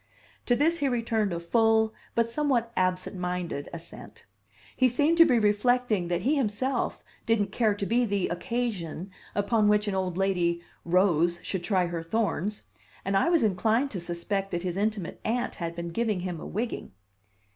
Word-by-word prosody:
To 245 - +4
this 325 +6 +2
he 285 - +1
returned 230 -5 0
a 170 - -2
full 220 +4 +3 0.2
but 230 0 +3
somewhat 240 -2 0
absent 185 +1 0
minded 180 -5 -3
assent. 170 -1 -10 0.5
He 255 -1 +4
seemed 295 +7 +2
to 335 - +10
be 250 -5 +4
reflecting 215 -2 +2
that 175 +1 -1
he 285 +6 +3
himself 255 +1 -1 0.2
didn't 210 -3 +2
care 215 -2 +2
to 200 - -3
be 240 +4 +2
the 200 -4 0
"occasion" 190 -3 -3 0.2
upon 210 +1 +2
which 210 0 +3
an 205 - 0
old 185 -2 -1
lady 175 -3 +1 0.2
rose 175 -1 +3
should 190 -3 -3
try 185 -2 +2
her 170 -1 -3
thorns; 210 +2 -1 0.4
and 195 +1 0
I 195 - +3
was 335 -5 +3
inclined 220 +7 +2
to 195 - -3
suspect 175 +3 -3
that 175 -1 -3
his 180 -2 -2
intimate 205 -3 -2
aunt 240 +2 -1
had 170 -1 -5
been 170 0 -4
giving 215 0 -1
him 180 -2 -4
a - - -7
wigging. 225 - -4
205 Hz, 175 wpm, -27 LUFS, 180-230 Hz, 0.5 s, to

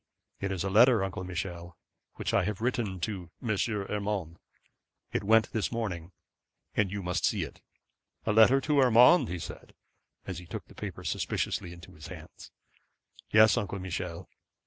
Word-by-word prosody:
'It 95 0 -2
is 95 -2 -2
a 100 - -1
letter, 115 0 +6
Uncle 95 -1 -4
Michel, 90 -1 -5 0.4
which - - -3
I - - +3
have 105 +1 -2
written 115 -5 -1
to 90 -2 -4
M. 110 -4 -1
Urmand. 100 -4 -3 0.7
It - - -1
went 110 +2 +4
this 110 - -1
morning, 95 -8 -4 0.6
and 105 -2 +1
you 100 -1 -4
must 90 0 -1
see - - +1
it.' - - -9 0.6
'A 110 - +2
letter 115 +5 +6
to 150 0 +2
Urmand,' 125 - +6
he 90 - -3
said, 85 - -9 0.5
as 90 -4 -5
he 90 - -12
took - - -6
the - - -17
paper - - -7
suspiciously 85 - -2
into 85 -1 -12
his 75 +1 -11
hands. 80 -3 -11 0.8
'Yes, 110 0 +6
Uncle 100 0 -2
Michel. 90 -2 -5
95 Hz, 165 wpm, -29 LUFS, 90-110 Hz, 0.8 s, letter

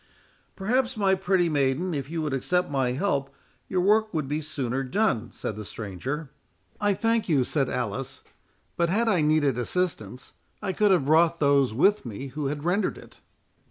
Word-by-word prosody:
"Perhaps, 245 +5 0
my 195 -2 +3
pretty 190 -2 +2
maiden, 145 +4 0
if 140 -2 -4
you 165 -1 -3
would 150 -3 -2
accept 180 +6 0
my 130 -3 +1
help, 140 -4 -1 0.3
your 185 -1 0
work 215 +3 +3
would 155 -4 -1
be 150 +3 -2
sooner 135 -4 -3
done," 130 - 0
said 105 - -5
the 105 - -6
stranger. 120 - -5 0.5
"I 205 -1 +2
thank 225 0 0
you," 140 -5 +3
said 135 0 0
Alice; 125 +3 -4 0.5
"but 170 -1 +1
had 225 +6 +1
I 185 -7 +3
needed 150 -4 +2
assistance, 125 - -2 0.3
I 190 - -2
could 210 +1 +3
have 180 -8 +3
brought 165 +3 +4
those 140 -3 +3
with 195 - +3
me 125 +4 -6
who 145 +2 -3
had 145 +1 -4
rendered 180 +5 0
it." - - -15
155 Hz, 175 wpm, -26 LUFS, 135-190 Hz, 0.5 s, brought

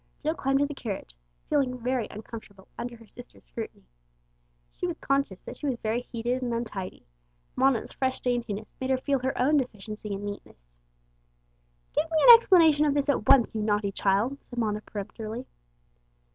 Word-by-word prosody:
Jill 310 +2 +1
climbed 270 -3 +1
into 285 +1 +1
the - - -13
carriage, 195 - -5 0.3
feeling 270 -4 +1
very 250 -1 -1
uncomfortable 210 -2 -10
under 240 0 -5
her 230 - -16
sister's 240 - -14
scrutiny. - - -7 0.9
She 360 - -3
was 345 - -3
conscious 275 -9 -1
that - - -8
she 295 - -4
was 260 -3 0
very 225 +2 -1
heated 245 +1 -3
and 245 -1 -2
untidy; 210 -5 -5 0.5
Mona's 260 -3 +2
fresh 260 -1 -1
daintiness 235 -4 -2
made 260 - -2
her 265 - +3
feel 275 +1 0
her 260 +1 -2
own 290 +5 +4
deficiency 215 -4 -4
in 200 +1 -4
neatness. 205 - -7 1.4
"Give 325 - 0
me 325 - +1
an 480 - +14
explanation 330 -9 +5
of 290 -1 +2
this 285 0 +1
at 235 -6 +1
once, 270 -4 +6
you 220 - -2
naughty 205 -1 +1
child," 210 +9 0
said 245 - -12
Mona 210 -2 0
peremptorily. 215 +4 -6
245 Hz, 170 wpm, -27 LUFS, 215-275 Hz, 1.4 s, an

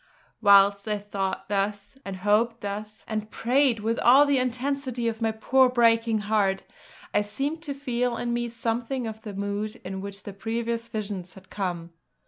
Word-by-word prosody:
Whilst 200 0 +6
I 210 -1 0
thought 195 -2 -3
thus, 200 +2 -2
and 195 - -5
hoped 225 +3 +2
thus, 210 +2 -6
and 215 -1 -3
prayed 250 -1 +2
with 225 +2 0
all 265 +5 +7
the 285 -2 +3
intensity 255 -1 -1
of 225 0 -3
my 225 -1 +2
poor 255 +4 +3
breaking 230 -2 +3
heart, 200 -2 +1 0.5
I - - +4
seemed 275 +10 -3
to 290 -4 -5
feel 250 -3 -1
in 240 0 -2
me 240 0 -1
something 235 +2 -2
of 220 0 -6
the 210 -3 -7
mood 205 +3 -3
in 190 +1 -4
which 200 0 -7
the 205 - -7
previous 230 +3 -3
visions 200 -5 -5
had 190 0 -16
come. 175 -4 -4
220 Hz, 170 wpm, -26 LUFS, 200-240 Hz, 0.5 s, all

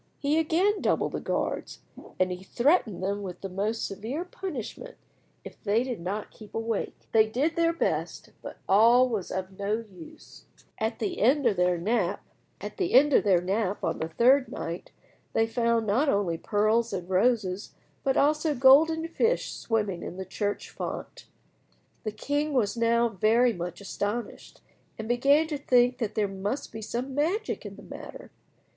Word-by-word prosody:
He 295 +3 +1
again 360 +6 +2
doubled - - +1
the - - -3
guards, - - -3 0.4
and 185 0 +2
he 180 0 -5
threatened 235 - +1
them 200 +2 -1
with 180 -3 -7
the 195 - -5
most 205 +5 -2
severe 230 - -4
punishment 365 - -7 0.5
if - - -12
they 220 +3 +2
did 250 -5 -4
not 200 +4 -4
keep 215 -2 -14
awake. 225 -1 -2 0.2
They 220 -1 +5
did 275 +9 0
their 335 0 +3
best, 335 - -2
but - - -8
all 235 +6 +6
was 220 -6 -3
of 190 +1 -5
no 200 +1 -1 0.2
use. 175 -4 -14 0.3
At 220 +1 -1
the 210 -3 -3
end 270 +6 +3
of 225 -4 +3
their 180 -1 +2
nap 200 +1 0 0.4
on 210 - +2
the 160 +1 -4
third 260 +3 +4
night 170 +2 -5 0.4
they 225 - +3
found 230 0 +1
not 245 +9 +2
only 200 -7 +1
pearls 215 +5 +1
and 180 -2 -4
roses, 195 -1 0 0.3
but 270 -1 +1
also 300 +1 +2
golden 315 +6 +5
fish 460 +8 0
swimming 210 -6 -2
in 180 - -7
the 190 - -5
church 205 +2 -3
font. - - -6 0.8
The 215 - -1
king 290 +7 -2
was 230 -6 +1
now 235 0 +3
very 230 +4 +3
much 175 -1 -6
astonished, 205 +3 -5 0.4
and 220 - -6
began 275 +6 +4
to 295 -3 -3
think 250 -2 +3
that 220 -4 -3
there 210 -2 +1
must 200 +7 -4
be 220 - -7
some 245 +5 -4
magic 345 +10 -1
in - - -10
the - - -13
matter. - - -10
225 Hz, 160 wpm, -27 LUFS, 200-275 Hz, 0.8 s, all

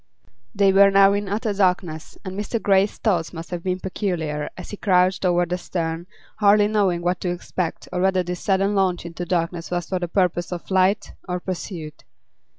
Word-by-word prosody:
They 195 -1 +4
were 200 +1 +7
now 195 0 +6
in 205 -1 -2
utter 210 +1 -1
darkness, 180 -5 -1
and 185 0 -5
Mr. 210 +3 -2
Grey's 200 -1 +2
thoughts 175 -7 0
must 165 +1 -8
have 175 -1 -3
been 185 +1 -2
peculiar 165 -6 -3
as 180 - -8
he 205 - -6
crouched 185 -1 +2
over 175 -1 +3
the 180 +1 -3
stern, 170 -1 -3 0.3
hardly 205 0 +5
knowing 195 -5 +1
what 180 +1 0
to 180 - -1
expect 175 -1 -4
or 180 - 0
whether 190 -1 +2
this 180 0 -4
sudden 195 +1 +1
launch 185 -3 +1
into 170 +1 -5
darkness 170 -1 -1
was 175 -1 -2
for 185 - -1
the 175 - -2
purpose 175 -1 0
of 175 -1 -4
flight 190 +2 +1 0.2
or 180 0 -1
pursuit. 175 -4 -6
185 Hz, 190 wpm, -23 LUFS, 175-195 Hz, 0.3 s, were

